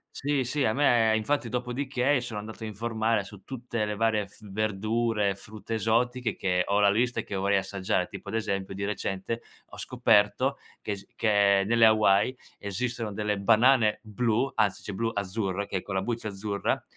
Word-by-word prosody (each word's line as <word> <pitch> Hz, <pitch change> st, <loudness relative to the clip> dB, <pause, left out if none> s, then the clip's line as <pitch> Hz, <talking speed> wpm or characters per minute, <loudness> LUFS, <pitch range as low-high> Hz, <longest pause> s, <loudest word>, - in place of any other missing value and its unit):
Sì, 140 Hz, -1 st, 0 dB
sì, 135 Hz, +3 st, 0 dB
a 110 Hz, -, +2 dB
me 120 Hz, -6 st, +4 dB
infatti, 120 Hz, +3 st, 0 dB
dopodiché 125 Hz, +3 st, 0 dB
sono 120 Hz, -4 st, -5 dB
andato 110 Hz, +2 st, -8 dB
a -, -, -3 dB
informare 110 Hz, 0 st, -1 dB
su 100 Hz, -1 st, -12 dB
tutte 120 Hz, -2 st, -3 dB
le 105 Hz, 0 st, -3 dB
varie 110 Hz, -1 st, +1 dB
f 100 Hz, -, -14 dB
verdure, 110 Hz, 0 st, 0 dB
frutta 105 Hz, +3 st, -7 dB
esotiche, 120 Hz, +2 st, 0 dB
che 90 Hz, -1 st, +1 dB
ho 100 Hz, +1 st, +1 dB
la 100 Hz, -1 st, +5 dB
lista 120 Hz, +4 st, +1 dB
che -, -, -6 dB
vorrei 100 Hz, +1 st, +2 dB
assaggiare. 95 Hz, -2 st, -1 dB
Tipo, -, -, -9 dB
ad 105 Hz, -, -4 dB
esempio, 100 Hz, -3 st, -2 dB
di 100 Hz, +1 st, -5 dB
recente 105 Hz, +2 st, -3 dB, 0.3 s
ho -, -, -13 dB
scoperto 105 Hz, +7 st, +2 dB, 0.2 s
che -, -, -4 dB
es 100 Hz, -1 st, -9 dB
che 100 Hz, -2 st, +3 dB
nelle 115 Hz, +2 st, +5 dB
Hawaii, 110 Hz, +2 st, +4 dB, 0.2 s
esistono 115 Hz, +2 st, -3 dB
delle 105 Hz, 0 st, -1 dB
banane 110 Hz, +2 st, +4 dB
blu 115 Hz, +4 st, 0 dB
anzi 105 Hz, -3 st, +1 dB
cioè 105 Hz, -, -5 dB
blu, 115 Hz, +3 st, -1 dB
azzurre, 100 Hz, 0 st, -2 dB
che 95 Hz, -, -2 dB
è -, -, -3 dB
con 100 Hz, -, -6 dB
la 95 Hz, -, +1 dB
buccia 115 Hz, +1 st, -3 dB
azzurra, 100 Hz, 0 st, -2 dB
110 Hz, 180 wpm, -27 LUFS, 100-120 Hz, 0.3 s, la